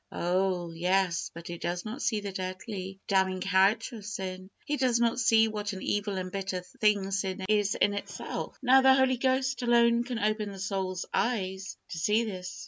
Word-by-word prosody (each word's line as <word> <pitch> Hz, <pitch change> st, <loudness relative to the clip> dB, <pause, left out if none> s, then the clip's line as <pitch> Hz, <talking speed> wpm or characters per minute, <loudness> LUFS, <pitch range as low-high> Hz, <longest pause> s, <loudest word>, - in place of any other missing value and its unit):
Oh! 180 Hz, -1 st, 0 dB
yes; 180 Hz, +1 st, +1 dB
but 170 Hz, 0 st, -10 dB
he 175 Hz, -1 st, -6 dB
does 175 Hz, +2 st, -3 dB
not 230 Hz, +6 st, -5 dB
see 225 Hz, -4 st, 0 dB
the 200 Hz, -1 st, -5 dB
deadly, 190 Hz, +1 st, -5 dB
damning 190 Hz, -1 st, +2 dB
character 200 Hz, +5 st, +2 dB
of 205 Hz, -, -11 dB
sin. 185 Hz, -2 st, -5 dB, 0.2 s
He 295 Hz, -, 0 dB
does 255 Hz, -4 st, +2 dB
not 235 Hz, +1 st, +2 dB
see 225 Hz, -1 st, +5 dB
what 210 Hz, -1 st, -3 dB
an 190 Hz, -, -7 dB
evil 205 Hz, -1 st, -1 dB
and 185 Hz, -1 st, -4 dB
bitter 190 Hz, -1 st, -3 dB
thing 195 Hz, +1 st, 0 dB
sin 195 Hz, -1 st, -2 dB
is 205 Hz, -1 st, +2 dB
in 205 Hz, -, +2 dB
itself. 200 Hz, -, -5 dB
Now, 265 Hz, +1 st, +6 dB
the 265 Hz, 0 st, +6 dB
Holy 265 Hz, -1 st, +3 dB
Ghost 260 Hz, +1 st, +1 dB
alone 235 Hz, -1 st, +4 dB
can 245 Hz, -1 st, -4 dB
open 215 Hz, -1 st, 0 dB
the 195 Hz, -, -9 dB
soul's 190 Hz, -2 st, -2 dB
eyes 195 Hz, -5 st, -1 dB
to 165 Hz, -, -5 dB
see 210 Hz, +7 st, +2 dB
this. 185 Hz, -4 st, -6 dB
200 Hz, 190 wpm, -29 LUFS, 185-230 Hz, 0.2 s, Now